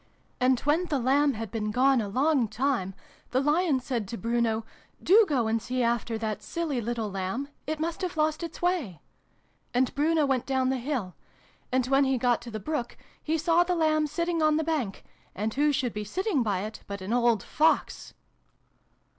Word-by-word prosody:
And 255 0 +3
when 310 +5 +2
the 300 -5 -1
Lamb 275 +3 +3
had 220 -2 -5
been 215 -2 -2
gone 255 +3 +3
a 210 - -3
long 265 +2 +2
time, 220 -4 -1 0.3
the 255 - +1
Lion 295 +1 +2
said 245 -5 -3
to 230 - -5
Bruno 230 +1 0 0.2
' - - -30
Do 420 +3 +6
go 260 -6 +1
and 225 0 0
see 255 +2 -1
after 235 -1 0
that 215 -2 -3
silly 290 +2 -2
little 225 -2 -3
Lamb! 195 +9 -3 0.2
It 310 0 -2
must 330 +3 -3
have 360 -3 -3
lost 310 +1 +1
its 335 0 -7
way.' 325 - 0 0.8
And 255 0 +2
Bruno 305 +1 +2
went 265 -3 0
down 260 -1 +1
the 265 - 0
hill. 240 -8 -3 0.6
And 255 -1 +2
when 275 +2 +3
he 265 -1 +1
got 245 -1 +1
to 240 - -9
the 215 -1 -5
brook, 280 -1 -4 0.2
he 320 +1 0
saw 335 +2 +3
the 355 0 -1
Lamb 310 -2 +2
sitting 335 +2 -1
on 310 -1 +3
the 320 - 0
bank: 295 -11 -2 0.3
and 215 +2 -2
who 295 +2 +2
should 260 -4 -1
be 210 - -4
sitting 365 - -1
by 205 -5 0
it 215 +2 -6
but 200 -1 -6
an 195 +5 -3
old 235 -4 +2
Fox 315 +2 0
260 Hz, 195 wpm, -27 LUFS, 225-310 Hz, 0.8 s, Do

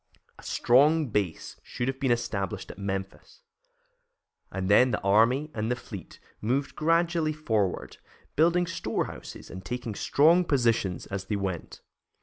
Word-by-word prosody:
A - - -11
strong 145 +4 +3
base 100 -6 -2
should 120 - -4
have 135 0 -2
been 135 -2 0
established 105 -5 -2
at - - -14
Memphis, 95 - -5 1.1
and 95 -1 -3
then 115 +6 +6
the 105 - -1
army 115 +9 +3
and 110 +1 -2
the 125 - +1
fleet 100 -7 -10 0.2
moved 130 +6 -1
gradually 165 0 +2
forward, 110 -11 -1 0.4
building 170 +3 +3
storehouses 175 - -4
and 95 +1 -8
taking 120 0 -4
strong 160 - +4
positions 115 - +1
as 95 -1 -5
they 105 - -2
went. 95 -4 -4
120 Hz, 135 wpm, -27 LUFS, 100-150 Hz, 1.1 s, then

